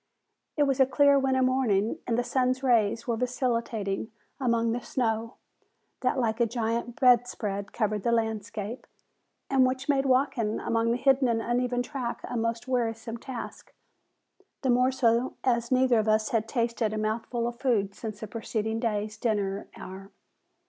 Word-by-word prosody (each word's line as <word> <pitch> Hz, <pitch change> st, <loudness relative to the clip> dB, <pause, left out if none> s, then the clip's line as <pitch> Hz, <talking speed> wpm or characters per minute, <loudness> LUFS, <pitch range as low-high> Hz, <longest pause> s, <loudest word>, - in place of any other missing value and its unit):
It 295 Hz, -, +4 dB
was 275 Hz, -2 st, +1 dB
a 265 Hz, -, +6 dB
clear 280 Hz, +1 st, +5 dB
winter 265 Hz, -1 st, +2 dB
morning, 235 Hz, -5 st, +1 dB
and 235 Hz, -1 st, +1 dB
the 245 Hz, -, +1 dB
sun's 255 Hz, +1 st, 0 dB
rays 230 Hz, -3 st, +2 dB
were 235 Hz, -2 st, -1 dB
vacillating 230 Hz, -4 st, -2 dB, 0.3 s
upon 235 Hz, -3 st, +1 dB
the 240 Hz, +2 st, -2 dB
snow, 230 Hz, -2 st, -2 dB, 0.6 s
that 255 Hz, +1 st, 0 dB
like 225 Hz, -3 st, 0 dB
a 235 Hz, -, +3 dB
gigantic 235 Hz, +1 st, -2 dB
bedspread 230 Hz, -5 st, +2 dB
covered 215 Hz, -3 st, -1 dB
the 235 Hz, -, 0 dB
landscape, 220 Hz, 0 st, -2 dB, 0.6 s
and 270 Hz, -1 st, +4 dB
which 260 Hz, +1 st, 0 dB
made 275 Hz, -2 st, +2 dB
walking 255 Hz, -4 st, +1 dB
upon 230 Hz, 0 st, 0 dB
the 235 Hz, -, +1 dB
hidden 265 Hz, 0 st, +3 dB
and 230 Hz, -1 st, +1 dB
uneven 245 Hz, +1 st, 0 dB
track 245 Hz, -3 st, -4 dB
a -, -, -5 dB
most 230 Hz, +1 st, -2 dB
wearisome 230 Hz, -2 st, -2 dB
task, 245 Hz, 0 st, -8 dB, 0.9 s
the 260 Hz, -, +3 dB
more 250 Hz, +2 st, +3 dB
so 240 Hz, -1 st, +1 dB
as 235 Hz, -1 st, +1 dB
neither 255 Hz, -2 st, +4 dB
of 215 Hz, -, -1 dB
us 215 Hz, 0 st, +2 dB
had 225 Hz, -1 st, 0 dB
tasted 230 Hz, -3 st, -1 dB
a -, -, -2 dB
mouthful 225 Hz, +2 st, -2 dB
of 240 Hz, 0 st, -4 dB
food 210 Hz, -7 st, +1 dB
since 215 Hz, -1 st, -7 dB
the 220 Hz, -, -5 dB
preceding 220 Hz, 0 st, -3 dB
day's 215 Hz, -2 st, -2 dB
dinner 205 Hz, -3 st, -1 dB
hour. 190 Hz, +1 st, -9 dB
235 Hz, 160 wpm, -28 LUFS, 220-255 Hz, 0.9 s, a